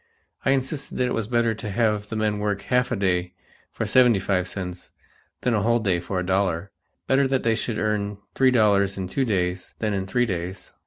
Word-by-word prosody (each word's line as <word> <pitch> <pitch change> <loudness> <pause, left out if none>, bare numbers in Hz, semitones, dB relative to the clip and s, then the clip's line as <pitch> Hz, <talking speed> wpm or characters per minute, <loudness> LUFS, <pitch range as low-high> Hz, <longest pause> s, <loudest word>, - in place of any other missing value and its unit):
I - - +1
insisted 135 +1 -1
that 125 - +2
it 125 - -1
was 115 -2 -1
better 115 -1 +2
to 110 -1 -6
have 105 -1 0
the 110 - -4
men 105 -1 0
work 105 -1 -1
half 125 0 +1
a - - +1
day 90 -3 0 0.4
for - - -3
seventy 125 -4 +5
five 95 -1 0
cents 90 -2 -6 0.5
than 125 - +1
a 105 - +2
whole 115 +3 +3
day 95 -6 +1
for 90 +2 -3
a 90 - -2
dollar, 95 -1 0 0.3
better 135 0 +3
that 135 -1 0
they 115 - +3
should 110 0 -2
earn 105 -1 -1 0.2
three 130 -1 +4
dollars 100 -5 +3
in 95 -1 -3
two 135 +8 0
days 90 -4 -1
than 110 -2 -1
in 95 -1 -2
three 125 +5 +2
days. 90 -2 -5
105 Hz, 215 wpm, -24 LUFS, 95-120 Hz, 0.5 s, seventy